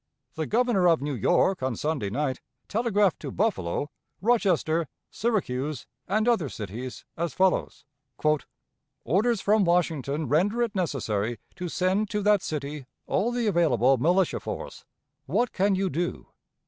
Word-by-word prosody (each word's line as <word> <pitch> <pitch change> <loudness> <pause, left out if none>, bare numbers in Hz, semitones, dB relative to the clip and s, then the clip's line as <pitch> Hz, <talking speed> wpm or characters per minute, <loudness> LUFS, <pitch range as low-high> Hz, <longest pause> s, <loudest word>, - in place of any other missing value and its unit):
The 160 -1 -3
Governor 225 -5 +3
of 165 -2 +4
New 145 0 -2
York 175 - +2
on 130 -2 -1
Sunday 145 -9 -2
night 130 +3 -2 0.3
telegraphed 210 -4 +1
to - - -6
Buffalo, 150 - -1 0.3
Rochester, 180 -8 +2 0.2
Syracuse, 150 - -1 0.2
and 215 +4 +1
other 220 - +2
cities, 115 +5 -7
as 165 -4 -3
follows: 185 -6 +1 1.2
"Orders 205 - +2
from 210 0 +3
Washington 160 -4 0
render 205 +11 +2
it 230 -3 -2
necessary 120 - -1 0.2
to 180 -1 -4
send 190 +5 +1
to 210 -2 -2
that 205 -1 +4
city 145 -5 -5 0.2
all 235 +4 +1
the 240 -1 -1
available 135 - +3
militia 175 +7 +2
force. - - -7 0.4
What 220 - +1
can 195 +1 +2
you 190 +1 0
do? 175 +2 -2
175 Hz, 135 wpm, -26 LUFS, 140-205 Hz, 1.2 s, of